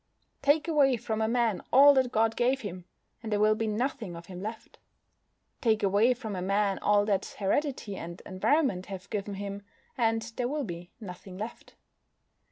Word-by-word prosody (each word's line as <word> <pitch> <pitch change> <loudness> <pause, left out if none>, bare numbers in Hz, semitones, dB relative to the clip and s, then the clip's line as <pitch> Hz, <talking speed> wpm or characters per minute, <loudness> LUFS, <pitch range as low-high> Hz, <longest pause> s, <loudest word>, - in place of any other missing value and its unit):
Take 295 +3 +3
away 280 -6 +4
from 220 -1 -3
a 220 - +2
man 230 -4 +1
all 285 +3 +8
that 260 -2 +2
God 225 0 +2
gave 255 +2 +1
him, 185 -4 -7 0.4
and 225 -2 -6
there 205 - +1
will 215 +1 +5
be 220 +1 -2
nothing 220 -3 -2
of 170 0 -9
him 180 0 -8
left. 220 +2 -7 0.8
Take 220 -3 +2
away 205 +6 +4
from 220 -5 -6
a 180 - -3
man 195 +1 +1
all 205 0 +3
that 200 -2 -1
heredity 215 0 -1
and 170 +1 -7
environment 190 - +1
have 195 -1 -8
given 205 -1 -3
him, 200 0 -5 0.3
and 225 -3 +1
there 245 - 0
will 295 +2 -2
be 175 -4 -7
nothing 185 -2 -9
left. 215 +4 -8
215 Hz, 175 wpm, -29 LUFS, 195-245 Hz, 0.8 s, all